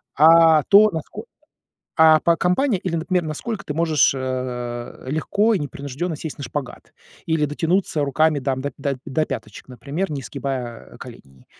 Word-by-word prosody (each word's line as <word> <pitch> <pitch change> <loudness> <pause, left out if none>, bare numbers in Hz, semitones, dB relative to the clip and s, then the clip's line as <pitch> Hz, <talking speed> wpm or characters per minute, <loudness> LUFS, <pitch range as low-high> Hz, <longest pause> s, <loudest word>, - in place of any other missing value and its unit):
а 160 +1 +6
то, 210 +1 +7
насколько, 160 -2 -7 0.7
а, 160 -1 +6
по 170 +1 +2
компания 195 +7 +1
или, 180 -1 -4
например, 175 +2 -1
насколько 195 +8 -5
ты 150 - -5
можешь, 160 -3 +3
э, 125 -2 -5
легко 200 - +1
и - - +1
непринужденно 145 +3 -5
сесть 155 0 -7
на 140 - -6
шпагат 130 +1 -7 0.3
или 160 -2 +1
дотянуться 165 +2 0
руками 155 +2 +2
там 130 0 -2
до 140 - -4
до 140 -1 -2
до 155 +3 0
пяточек, 105 - -7
например, 145 - -4
не 140 - -4
сгибая, 130 -4 -6
а, - - -14
коленей. 65 -1 -13
150 Hz, 160 wpm, -21 LUFS, 135-165 Hz, 0.7 s, то